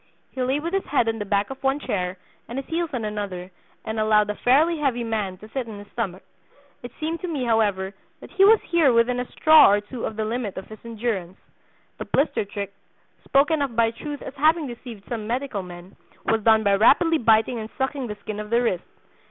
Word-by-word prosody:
He 260 Hz, -, -5 dB
lay 260 Hz, +3 st, +1 dB
with 335 Hz, +4 st, -4 dB
his 390 Hz, -, 0 dB
head 270 Hz, -5 st, +1 dB
on 225 Hz, 0 st, -1 dB
the 205 Hz, -, -3 dB
back 200 Hz, +3 st, 0 dB
of 270 Hz, -, -8 dB
one 270 Hz, +1 st, +1 dB
chair, 185 Hz, -7 st, -3 dB, 0.3 s
and 240 Hz, -, -6 dB
his 270 Hz, -, -4 dB
heels 335 Hz, 0 st, -2 dB
on 245 Hz, -5 st, -3 dB
another, 195 Hz, -4 st, -5 dB, 0.3 s
and 220 Hz, 0 st, -3 dB
allowed 210 Hz, -1 st, +3 dB
a -, -, -6 dB
fairly 305 Hz, +9 st, +3 dB
heavy 255 Hz, -5 st, 0 dB
man 210 Hz, -5 st, -2 dB
to 215 Hz, +3 st, -13 dB
sit 255 Hz, 0 st, -4 dB
on 210 Hz, -, -8 dB
his 205 Hz, 0 st, -12 dB
stomach; 195 Hz, -6 st, -4 dB, 0.6 s
it 245 Hz, -, -8 dB
seemed 325 Hz, +2 st, -2 dB
to 365 Hz, -, -3 dB
me, 300 Hz, -6 st, -2 dB
however, 205 Hz, -4 st, +1 dB, 0.3 s
that -, -, -13 dB
he 385 Hz, 0 st, +3 dB
was 430 Hz, +2 st, +7 dB
here 330 Hz, -6 st, +3 dB
within 240 Hz, +1 st, +2 dB
a 250 Hz, -, -5 dB
'straw' 310 Hz, 0 st, +7 dB
or 205 Hz, -, +3 dB
two 225 Hz, +4 st, -6 dB
of 220 Hz, -, -4 dB
the 220 Hz, 0 st, -2 dB
limit 225 Hz, -2 st, -3 dB
of 190 Hz, -, -6 dB
his 215 Hz, -1 st, -10 dB
endurance. 220 Hz, -6 st, -3 dB, 0.6 s
The -, -, -4 dB
'blister 275 Hz, -6 st, 0 dB
trick,' 200 Hz, 0 st, -6 dB, 0.5 s
spoken 295 Hz, +3 st, +3 dB
of 270 Hz, -5 st, -2 dB
by 225 Hz, 0 st, +3 dB
Truth 290 Hz, +5 st, -7 dB
as -, -, -7 dB
having 315 Hz, +2 st, +3 dB
deceived 235 Hz, -4 st, -9 dB
some 225 Hz, -3 st, -4 dB
medical 245 Hz, -3 st, -2 dB
men, 180 Hz, +1 st, -11 dB, 0.3 s
was 225 Hz, 0 st, +1 dB
done 220 Hz, 0 st, +4 dB
by 200 Hz, -1 st, +3 dB
rapidly 320 Hz, -, +4 dB
biting 225 Hz, +1 st, +3 dB
and 220 Hz, 0 st, -6 dB
sucking 265 Hz, -1 st, -2 dB
the 210 Hz, -1 st, -6 dB
skin 215 Hz, -1 st, -5 dB
of 210 Hz, 0 st, -6 dB
the 235 Hz, +1 st, +3 dB
wrist. 185 Hz, -7 st, 0 dB
230 Hz, 225 wpm, -24 LUFS, 210-275 Hz, 0.6 s, was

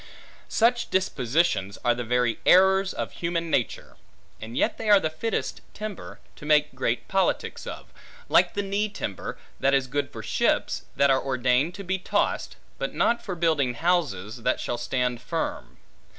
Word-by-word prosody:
Such 235 Hz, +1 st, +2 dB
dispositions, 145 Hz, -, +1 dB
are 120 Hz, -, +5 dB
the 120 Hz, +1 st, -4 dB
very 120 Hz, 0 st, +1 dB
errors 190 Hz, +1 st, +5 dB
of -, -, -4 dB
human 170 Hz, -1 st, -2 dB
nature; 120 Hz, -, -1 dB, 0.4 s
and 115 Hz, +3 st, -7 dB
yet -, -, +1 dB
they 220 Hz, -, -2 dB
are 205 Hz, -1 st, +8 dB
the 155 Hz, -4 st, -2 dB
fittest 225 Hz, +8 st, -3 dB
timber, 215 Hz, -3 st, -7 dB, 0.2 s
to -, -, -13 dB
make 150 Hz, -1 st, +3 dB
great 120 Hz, -2 st, -1 dB
politics 195 Hz, 0 st, 0 dB
of; -, -, -8 dB, 0.3 s
like -, -, +4 dB
to 205 Hz, -, 0 dB
knee 200 Hz, +2 st, -1 dB
timber, 100 Hz, -, -5 dB, 0.2 s
that 140 Hz, +1 st, +3 dB
is 135 Hz, -1 st, +2 dB
good 145 Hz, +3 st, -2 dB
for -, -, -8 dB
ships, -, -, 0 dB
that 140 Hz, 0 st, +4 dB
are 135 Hz, -, +3 dB
ordained 130 Hz, +5 st, +1 dB
to 200 Hz, -, -7 dB
be 190 Hz, +1 st, -1 dB
tossed; -, -, -1 dB, 0.2 s
but -, -, -3 dB
not 235 Hz, 0 st, +2 dB
for 190 Hz, -5 st, -4 dB
building 155 Hz, -7 st, +1 dB
houses, 130 Hz, -, 0 dB
that 125 Hz, +2 st, +1 dB
shall 120 Hz, -, -3 dB
stand 125 Hz, 0 st, -1 dB
firm. 165 Hz, +6 st, -4 dB
150 Hz, 165 wpm, -26 LUFS, 125-190 Hz, 0.4 s, are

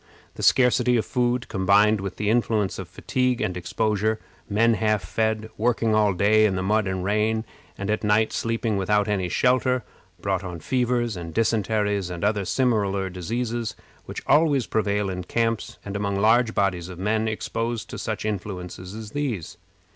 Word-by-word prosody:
The -, -, -8 dB
scarcity 125 Hz, -1 st, +4 dB
of 110 Hz, -, 0 dB
food, 125 Hz, -2 st, 0 dB
combined 100 Hz, +2 st, +3 dB
with 95 Hz, -2 st, -5 dB
the 105 Hz, 0 st, 0 dB
influence 110 Hz, -5 st, +1 dB
of 95 Hz, -, -6 dB
fatigue 125 Hz, +7 st, -1 dB
and 95 Hz, -4 st, -1 dB
exposure 110 Hz, +4 st, 0 dB, 0.3 s
men 115 Hz, +3 st, +3 dB
half 110 Hz, -3 st, +1 dB
fed, 110 Hz, +3 st, -1 dB
working 115 Hz, -1 st, +1 dB
all 105 Hz, -2 st, +3 dB
day 110 Hz, +3 st, +4 dB
in 100 Hz, -3 st, +1 dB
the 95 Hz, -, -1 dB
mud 105 Hz, +1 st, +1 dB
and 95 Hz, -1 st, -2 dB
rain, 110 Hz, +3 st, +1 dB, 0.3 s
and 100 Hz, -, -4 dB
at 110 Hz, -, -1 dB
night 105 Hz, +1 st, +2 dB
sleeping 115 Hz, -2 st, -1 dB
without 105 Hz, +2 st, +1 dB
any 95 Hz, -4 st, 0 dB
shelter 125 Hz, +3 st, +2 dB, 0.4 s
brought 95 Hz, 0 st, -1 dB
on 90 Hz, -2 st, -6 dB
fevers 120 Hz, -, 0 dB
and 85 Hz, -2 st, -7 dB
dysenteries, 105 Hz, -3 st, +1 dB
and 85 Hz, 0 st, -6 dB
other 105 Hz, -1 st, +1 dB
similar 100 Hz, -6 st, +1 dB
diseases, 115 Hz, +5 st, -3 dB, 0.3 s
which -, -, -7 dB
always 145 Hz, -5 st, +3 dB
prevail 105 Hz, -2 st, 0 dB
in 90 Hz, -1 st, -4 dB
camps, 115 Hz, +1 st, -1 dB
and 100 Hz, 0 st, -5 dB
among 100 Hz, -1 st, -1 dB
large 115 Hz, +2 st, +3 dB
bodies 95 Hz, -3 st, 0 dB
of 90 Hz, -, -8 dB
men 110 Hz, +4 st, 0 dB
exposed 115 Hz, +1 st, -3 dB
to -, -, -6 dB
such -, -, -3 dB
influences 95 Hz, -2 st, -5 dB
as 110 Hz, -1 st, -8 dB
these. 125 Hz, -, -3 dB
105 Hz, 170 wpm, -24 LUFS, 100-115 Hz, 0.4 s, scarcity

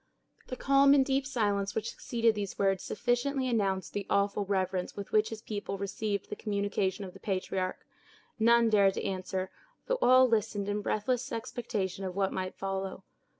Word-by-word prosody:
The 255 Hz, -, -4 dB
calm 275 Hz, +1 st, +5 dB
and 270 Hz, -2 st, +4 dB
deep 270 Hz, 0 st, 0 dB
silence 205 Hz, -6 st, 0 dB
which 220 Hz, 0 st, -2 dB
succeeded 230 Hz, -1 st, +1 dB
these 205 Hz, -2 st, -4 dB
words 195 Hz, -2 st, +2 dB
sufficiently 255 Hz, +4 st, 0 dB
announced 195 Hz, -6 st, 0 dB
the 200 Hz, -1 st, -3 dB
awful 200 Hz, 0 st, +1 dB
reverence 190 Hz, -2 st, -1 dB
with 200 Hz, -1 st, -7 dB
which 215 Hz, 0 st, +3 dB
his 220 Hz, 0 st, -7 dB
people 205 Hz, -2 st, -4 dB
received 200 Hz, +1 st, -3 dB
the -, -, -2 dB
communication 200 Hz, -1 st, -1 dB
of 185 Hz, -, -9 dB
the -, -, -13 dB
patriarch. 185 Hz, -1 st, -2 dB, 0.5 s
None 230 Hz, 0 st, +5 dB
dared 200 Hz, -2 st, +4 dB
to -, -, -3 dB
answer, 185 Hz, -1 st, -3 dB, 0.3 s
though -, -, 0 dB
all 255 Hz, +1 st, +7 dB
listened 210 Hz, -3 st, 0 dB
in 205 Hz, 0 st, -1 dB
breathless 240 Hz, +5 st, -1 dB
expectation 210 Hz, -5 st, -3 dB
of 185 Hz, -1 st, -4 dB
what 195 Hz, -1 st, 0 dB
might 185 Hz, 0 st, -3 dB
follow. 195 Hz, 0 st, -4 dB
205 Hz, 170 wpm, -30 LUFS, 195-230 Hz, 0.5 s, all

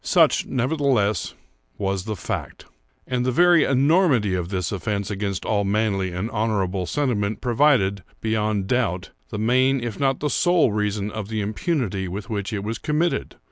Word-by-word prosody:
Such, -, -, +3 dB
nevertheless, 130 Hz, -, 0 dB, 0.4 s
was 95 Hz, -2 st, -2 dB
the 110 Hz, -1 st, -3 dB
fact. 90 Hz, -, -5 dB, 0.4 s
And 125 Hz, -1 st, -1 dB
the 130 Hz, -, +1 dB
very 175 Hz, +3 st, +5 dB
enormity 135 Hz, -, +3 dB
of 90 Hz, -1 st, -2 dB
this 90 Hz, -3 st, -2 dB
offence 100 Hz, 0 st, -2 dB
against 100 Hz, -2 st, -3 dB
all 105 Hz, -2 st, +1 dB
manly 100 Hz, -2 st, 0 dB
and 90 Hz, +4 st, -3 dB
honourable 100 Hz, -4 st, -1 dB
sentiment 110 Hz, -8 st, -1 dB
proved, 120 Hz, -6 st, +2 dB, 0.2 s
beyond 110 Hz, -2 st, 0 dB
doubt, 95 Hz, -6 st, -1 dB, 0.2 s
the 105 Hz, -, -5 dB
main 130 Hz, +5 st, +2 dB
if 120 Hz, -3 st, -5 dB
not 135 Hz, -2 st, +1 dB
the 150 Hz, -, -1 dB
sole 175 Hz, -8 st, +3 dB
reason 105 Hz, 0 st, -1 dB
of 110 Hz, -2 st, -5 dB
the 110 Hz, 0 st, -2 dB
impunity 105 Hz, -, -2 dB
with 100 Hz, +5 st, -6 dB
which 100 Hz, 0 st, -3 dB
it 100 Hz, -2 st, -3 dB
was 110 Hz, +2 st, -4 dB
committed. 160 Hz, +3 st, -1 dB
110 Hz, 160 wpm, -23 LUFS, 100-130 Hz, 0.4 s, very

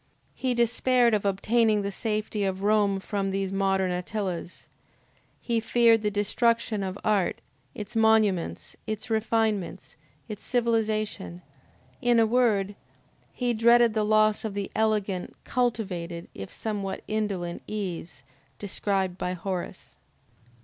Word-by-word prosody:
He 255 Hz, -2 st, -1 dB
despaired 240 Hz, 0 st, +3 dB
of 205 Hz, -1 st, +1 dB
obtaining 210 Hz, +2 st, +2 dB
the 200 Hz, -, -2 dB
safety 215 Hz, 0 st, -2 dB
of 190 Hz, 0 st, -2 dB
Rome 205 Hz, -2 st, +3 dB
from 195 Hz, 0 st, -2 dB
these 195 Hz, 0 st, -2 dB
modern 195 Hz, -1 st, +1 dB
Attilas, 180 Hz, -1 st, -4 dB, 0.7 s
he 235 Hz, -2 st, 0 dB
feared 225 Hz, 0 st, +4 dB
the 210 Hz, -, +1 dB
destruction 215 Hz, +1 st, +1 dB
of 190 Hz, 0 st, -3 dB
art, 205 Hz, -4 st, +1 dB, 0.4 s
its 210 Hz, +1 st, -7 dB
monuments, 215 Hz, -, +2 dB
its 215 Hz, +2 st, -4 dB
refinements, 220 Hz, -3 st, 0 dB, 0.3 s
its 210 Hz, -1 st, -7 dB
civilization; 215 Hz, -6 st, -1 dB, 0.6 s
in 240 Hz, -1 st, +4 dB
a 225 Hz, -, +5 dB
word, 220 Hz, -4 st, +2 dB, 0.6 s
he 245 Hz, -1 st, -1 dB
dreaded 235 Hz, 0 st, +5 dB
the 215 Hz, -1 st, +1 dB
loss 215 Hz, 0 st, +3 dB
of 215 Hz, -3 st, -4 dB
the 200 Hz, -1 st, -3 dB
elegant, 210 Hz, -4 st, 0 dB
cultivated 190 Hz, -9 st, -2 dB
if 95 Hz, -, -8 dB
somewhat 205 Hz, -3 st, -4 dB
indolent 200 Hz, -5 st, -2 dB
ease 185 Hz, -5 st, -5 dB, 0.3 s
described 195 Hz, -2 st, -1 dB
by 180 Hz, -, -1 dB
Horace. 185 Hz, 0 st, -5 dB
210 Hz, 120 wpm, -27 LUFS, 195-225 Hz, 0.7 s, a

